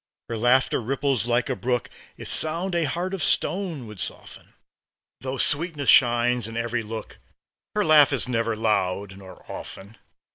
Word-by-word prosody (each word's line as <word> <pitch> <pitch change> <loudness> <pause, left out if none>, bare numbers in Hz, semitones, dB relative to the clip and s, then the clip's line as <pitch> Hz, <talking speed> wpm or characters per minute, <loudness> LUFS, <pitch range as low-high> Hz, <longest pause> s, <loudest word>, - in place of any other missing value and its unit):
Her 115 - -3
laughter 125 +3 +2
ripples 135 0 0
like 120 0 +1
a 130 - -1
brook; 125 0 -1 0.3
Its - - -3
sound 170 +4 0
a 170 -2 +1
heart 175 +7 -3
of 195 - -3
stone 175 -9 0
would 105 -3 -11
soften. - - -8 0.6
Though 130 +2 -4
sweetness 145 +1 +1
shines 120 -2 +4
in 115 0 -7
every 115 0 -1
look, 110 0 -8 0.6
Her 210 -1 +1
laugh 150 -2 +6
is 135 -2 0
never 115 -2 -1
loud, 100 -3 -1
nor 95 -2 -13
often. 100 +4 -9
125 Hz, 155 wpm, -24 LUFS, 115-145 Hz, 0.6 s, laugh